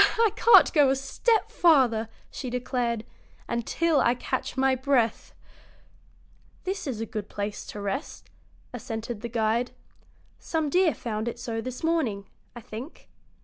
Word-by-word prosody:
"I 455 -2 +4
can't 470 - +7
go 290 -5 +5
a 265 - +3
step 430 - 0
farther," 250 -10 +4 0.2
she 255 - -5
declared, 240 -2 -2 0.4
"until 295 +7 +1
I 240 - +3
catch 250 - -3
my 265 0 +3
breath." 260 -3 +1 1.3
"This 380 -3 -3
is 230 -5 -3
a - - -1
good 215 -2 -6
place 205 0 -5
to 210 - -7
rest," 205 +9 -5 0.4
assented 225 -1 -5
the 235 - -5
guide. 230 +1 0 0.7
"Some 315 -3 -2
deer 360 -2 +3
found 220 -1 -4
it 235 - -3
so 230 -2 -4
this 255 +4 -7
morning, 270 -12 0 0.3
I 240 - -8
think. 230 +8 -9
245 Hz, 145 wpm, -26 LUFS, 225-285 Hz, 1.3 s, can't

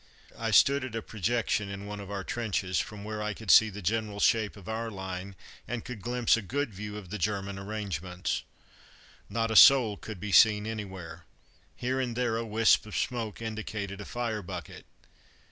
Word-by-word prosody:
I 115 -1 -2
stood 140 +6 +5
at 130 -3 -5
a 115 - -3
projection 110 -1 -1
in 100 0 -6
one 105 0 -6
of 100 -1 -8
our 100 -1 -4
trenches, 100 -5 -1
from 105 -1 -5
where 105 0 -4
I 105 -1 -2
could 110 -2 0
see 110 - +8
the 105 0 -8
general 105 +1 -1
shape 110 -1 +2
of 95 - -13
our 115 +1 -3
line, 95 -1 -6 0.3
and 120 -1 -4
could 120 -5 -7
glimpse 120 +2 +2
a 115 - -2
good 130 +4 -2
view 105 +2 -6
of 95 -4 -10
the 105 - -4
German 100 0 -2
arrangements. 95 -4 -3 0.9
Not 115 -1 -1
a - - -1
soul 115 -5 +8
could 110 -2 -8
be 105 +1 -4
seen 105 0 +6
anywhere. 95 -7 -6 0.5
Here 130 +2 -1
and 125 -3 -2
there 120 -2 0
a 115 - -1
wisp 110 0 +3
of 110 - -4
smoke 115 -3 -3
indicated 105 -3 -4
a - - -7
fire 115 -2 -3
bucket. 90 -4 -8
105 Hz, 190 wpm, -29 LUFS, 100-115 Hz, 0.9 s, see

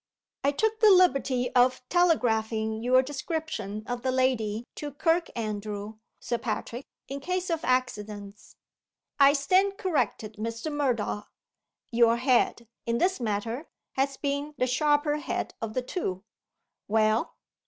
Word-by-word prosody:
"I 280 - +4
took 440 +8 0
the 435 - +7
liberty 275 -9 +3
of 250 0 +3
telegraphing 220 -10 +1
your 255 +2 +4
description 290 - -4
of 245 0 -4
the 260 +1 0
lady 240 -4 0
to 295 -2 -5
Kirkandrew, 215 - -2 0.2
Sir 240 - -2
Patrick, 240 +2 -4 0.2
in 275 +1 -5
case 365 +4 -2
of 325 -1 -1
accidents." 210 -5 -2 0.6
"I 280 0 +7
stand 375 +8 +2
corrected, 250 - -1
Mr. 230 +6 -4
Murdoch. 245 -8 -1 0.6
Your 235 0 +4
head, 245 -2 +2 0.2
in 235 0 +1
this 375 +7 +1
matter, 230 +5 -3 0.2
has 270 0 -1
been 285 +1 -2
the 255 - +2
sharper 295 +3 +2
head 300 - -3
of 220 -1 -4
the 255 - 0
two. 190 - -3 0.6
Well?" 215 +1 +2
255 Hz, 130 wpm, -27 LUFS, 220-295 Hz, 0.6 s, the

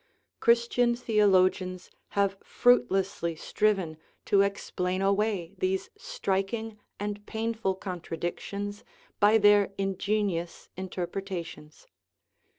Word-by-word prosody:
Christian 235 +1 +3
theologians 185 -5 +2 0.3
have 200 -1 +2
fruitlessly 195 -7 +2
striven 190 -2 0 0.3
to 200 - +4
explain 185 -2 -1
away 195 -2 0
these 190 0 -1
striking 220 - -3 0.2
and 205 0 -4
painful 220 -3 -1
contradic 175 -2 -4
tions 205 +1 -5 0.4
by 210 +2 +6
their 205 -2 +5
ingenious 195 -2 -1
interpretations. 180 -3 -6
195 Hz, 85 wpm, -28 LUFS, 185-210 Hz, 0.4 s, by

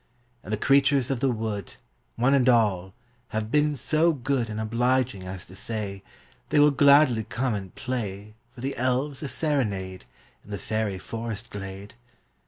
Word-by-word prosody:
And 105 - -8
the 110 - +1
creatures 140 +2 +3
of 135 - -1
the 135 - +2
wood, 110 -5 -3 0.4
One 125 +4 +3
and 130 -2 +4
all, 95 -6 +2 0.3
have 110 0 -3
been 150 +1 +3
so 155 +6 +2
good 130 -3 -1
And 105 0 -4
obliging 120 -2 0
as 95 0 -6
to 95 - -13
say, 100 -2 -4 0.5
They - - +1
will 145 0 +6
gladly 140 -4 +5
come 120 +3 -2
and 95 -3 -6
play 105 -5 -4 0.2
For 120 - -10
the 135 +2 -3
elves 130 +3 0
a 150 - -3
serenade, 105 - -1 0.4
In - - -18
the 100 - -3
fairy 105 0 -2
forest 115 +3 -5
glade. 100 0 -7
115 Hz, 165 wpm, -26 LUFS, 100-135 Hz, 0.5 s, will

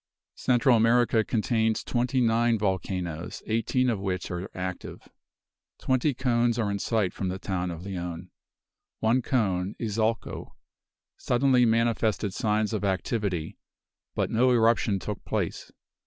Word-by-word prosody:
Central 125 0 +3
America 115 0 +3
contains 110 0 0
twenty 125 +1 0
nine 115 0 +3
volcanoes, 90 -4 -3
eighteen 115 +3 +1
of 115 -5 0
which 95 -3 -3
are 90 +2 -4
active. 90 -1 -6 0.7
Twenty 130 +2 +1
cones 120 -2 +1
are 110 -4 0
in 100 - -2
sight 105 -5 0
from 95 - -3
the 95 - -3
town 90 -1 -3
of 85 0 -6
Leon. 90 -2 -5 0.7
One 115 +4 +2
cone, 100 -7 0
Izalco, 110 0 -2 0.6
suddenly 125 -1 +3
manifested 115 -3 +1
signs 105 +1 0
of 105 - -2
activity, 95 -3 -2 0.6
but - - -1
no 125 +3 +3
eruption 115 -3 +3
took 105 +1 -6
place. - - -3
110 Hz, 125 wpm, -27 LUFS, 95-120 Hz, 0.7 s, Central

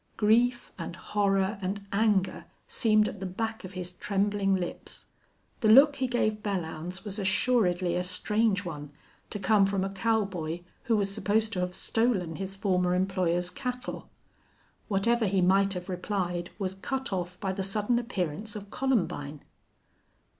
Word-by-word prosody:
Grief 240 +3 +3
and - - -5
horror 195 0 0
and 195 +2 -3
anger 200 -3 +1 0.2
seemed 215 -2 +3
at 205 - -6
the 190 - -4
back 220 +4 -3
of 185 +1 -8
his 180 -1 -5
trembling 200 +1 0
lips. 180 -2 -4 0.5
The 220 - +1
look 280 +5 +8
he 260 -1 0
gave 215 -3 0
Belllounds 180 -2 -4
was 205 0 -4
assuredly 190 -3 +2
a 180 - +1
strange 200 +2 +1
one, 150 -4 -6 0.4
to - - -3
come 200 0 +4
from 195 -1 0
a 195 - -2
cowboy 195 -6 -1 0.2
who 225 -2 +3
was 200 -1 0
supposed 220 +2 +1
to 180 - -2
have 180 0 -2
stolen 205 -9 +1
his 195 0 -2
former 180 -2 +1
employer's 180 -2 +1
cattle. 250 -1 -5 0.8
Whatever 220 +2 +2
he 195 0 +1
might 195 +2 +4
have 180 0 -5
replied 180 -2 -2
was 190 -2 -2
cut 265 +5 -3
off 180 -1 -3
by 190 -2 -2
the 195 - -3
sudden 210 +5 +1
appearance 210 -3 -3
of 205 -1 -8
Columbine. 170 - -1
195 Hz, 155 wpm, -28 LUFS, 180-215 Hz, 0.8 s, look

